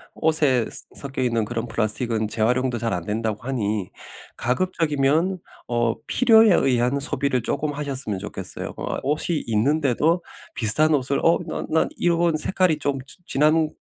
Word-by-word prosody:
옷에 150 -7 +2
스 - - -5
섞여 135 -2 -4
있는 115 -3 0
그런 120 +1 -4
플라스틱은 110 0 -1
재활용도 125 +3 0
잘 115 -1 -1
안 90 -1 -3
된다고 110 0 -3
하니 110 -6 -2 0.5
가급적이면 160 +3 0 0.3
어 120 -1 0
필요에 225 -4 +5
의한 125 0 +1
소비를 140 -2 +1
쪼끔 150 +4 -2
하셨으면 135 -8 -2
좋겠어요. 105 +1 -5
어 - - -4
옷이 150 +3 0
있는데도 145 +8 +1 0.3
비슷한 125 +7 +5
옷을 140 +1 0
"어 165 - +4
난 - - -5
난 160 - +1
이런 170 -2 +1
색깔이 180 -1 +1
좀 140 -2 -1
지 140 - -7
지난번 155 +2 +2
135 Hz, 320 characters per minute, -23 LUFS, 115-155 Hz, 0.5 s, 필요에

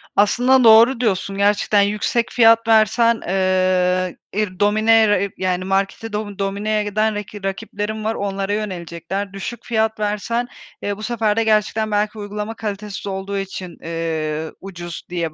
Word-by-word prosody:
Aslında 245 +5 +4
doğru 230 +3 +7
diyorsun. 195 -3 -1
Gerçekten 205 0 +3
yüksek 210 +3 0
fiyat 230 -1 +5
versen, 225 +1 +4
ııı, 185 -2 +1 0.2
ir 195 -3 -2
dominere 215 0 +3
yani 185 -1 -1
marketi 195 +3 -1
domi 210 -1 -4
domineye 205 +2 -1
giden 215 +1 0
raki 205 -1 -7
rakiplerin 210 +2 -4
var, 220 +1 -1
onlara 195 0 -2
yönelecekler. 185 -1 -4
Düşük 195 +5 -6
fiyat 220 -1 0
versen, 210 +3 -1 0.4
eee, 205 0 -2
bu 215 - -9
sefer 220 -3 0
de 230 - +3
gerçekten 215 0 +1
belki 210 +1 0
uygulama 210 +1 -5
kalitesiz 210 -1 -5
olduğu 195 +1 -4
için, 190 -2 -6
eee, 160 -1 -3
ucuz 175 -3 -7
diye 170 -3 -3
205 Hz, 140 wpm, -20 LUFS, 190-220 Hz, 0.4 s, doğru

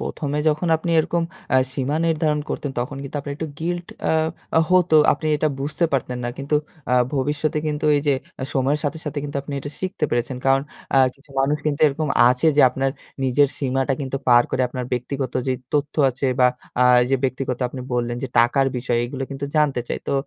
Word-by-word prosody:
১ম 150 - -4
এ - - +1
যখন 155 +3 0
আপনি 165 +2 -4
এরকম 170 +2 +1 0.3
অ্যা 130 - +5
সীমা 140 +2 -1
নির্ধারণ 155 -2 +1
করতেন 145 - -3
তখন 130 +3 -4
কিন্তু 140 +1 -6
আপনার 140 0 -5
একটু 160 - -4
guilt 175 +1 -2 0.2
আ - - +2 0.5
অ - - +6
হতো। 185 -1 +5
তো 155 - +6 0.2
আপনি 155 - -4
এটা 155 +1 +1
বুঝতে 150 +4 0
পারতেন 125 -2 -1
না। - - -1
কিন্তু 140 +2 0 0.4
আ - - +5 0.2
ভবিষ্যতে 145 +3 0
কিন্তু 150 0 -2
এই - - +2
যে 140 - +4 0.3
আ - - -1
সময়ের 140 +3 +1
সাথে, 155 +3 -1
সাথে 150 -1 -3
কিন্তু 145 -1 -4
আপনি 145 - -8
এটা 145 - -6
শিখতে 185 -4 -2
পেরেছেন। 120 +2 -1
কারণ 135 0 +4 0.3
আ - - +7 0.2
কিছু 140 +1 -25
মানুষ 145 +2 +2
কিন্তু 145 -1 -1
এরকম 150 +1 -1 0.2
আছে 125 +6 +2
যে - - +6
আপনার 135 +1 -1 0.3
নিজের 130 +2 +3
সীমাটা 135 0 0
কিন্তু 135 -1 -3
পার 120 -1 +7
করে 130 - +1
আপনার 125 0 -4
ব্যক্তিগত 130 +1 -2
যেই 130 -1 0 0.2
তথ্য 145 0 0 0.2
আছে 130 +3 -3
বা 125 - +7 0.3
আ - - +6 0.2
এইযে 135 +2 +1
ব্যক্তিগত 130 -1 -2
আপনি 130 +1 -7
বললেন 120 0 -1
যে 135 - -3
টাকার 120 +4 +4
বিষয়, 120 -1 0
এগুলো 135 +2 -5
কিন্তু 140 +1 -4
জানতে 145 -5 +2
চায়। - - -3
তো - - 0
140 Hz, 210 wpm, -22 LUFS, 130-150 Hz, 0.5 s, আ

